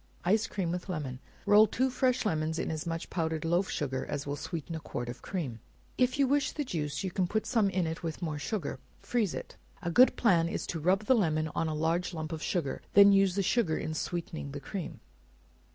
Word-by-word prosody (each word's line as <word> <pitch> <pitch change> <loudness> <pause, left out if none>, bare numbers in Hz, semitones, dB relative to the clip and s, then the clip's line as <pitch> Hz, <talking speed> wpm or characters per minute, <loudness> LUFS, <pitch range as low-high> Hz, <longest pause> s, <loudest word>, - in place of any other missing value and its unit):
Ice 215 +5 +3
Cream 180 -4 -2
with 180 +2 -4
Lemon. 145 -7 -4 0.3
Roll 210 +1 +7
two 260 +4 0
fresh 255 -1 +1
lemons, 160 -4 0
in - - -2
as 155 +1 -4
much 165 0 -4
powdered 160 -2 -1
loaf 175 +3 +1
sugar 130 -3 -2
as 140 - -3
will 140 0 -2
sweeten 165 +2 -5
a 160 - -3
quart 120 -5 -5
of 120 - -7
cream; 145 -12 -4 0.4
if 255 +1 +2
you 280 -1 +4
wish 280 0 +1
the 295 - -2
juice, 150 - -3
you 190 - -2
can 185 0 0
put 215 +4 -1
some 220 -5 +2
in 175 -4 -1
with 165 -2 -4
more 155 -4 -3
sugar; 150 - -3 0.2
freeze 225 -7 0
it. - - -7 0.3
A 175 - -1
good 250 +9 +6
plan 170 -7 +3
is - - -3
to 165 - -4
rub 190 +6 +2
the 260 - +5
lemon 155 -8 +1
on 165 +2 -1
a 155 - -2
large 165 +3 0
lump 155 0 -4
of 160 -1 -4
sugar, 160 -7 -1
and - - -29
then 200 0 +9
use 195 -2 +4
the 200 - +1
sugar 190 -5 +2
in 155 - -3
sweetening 160 -3 -4
the 145 - -4
cream. 185 +3 -6
170 Hz, 225 wpm, -30 LUFS, 155-200 Hz, 0.4 s, then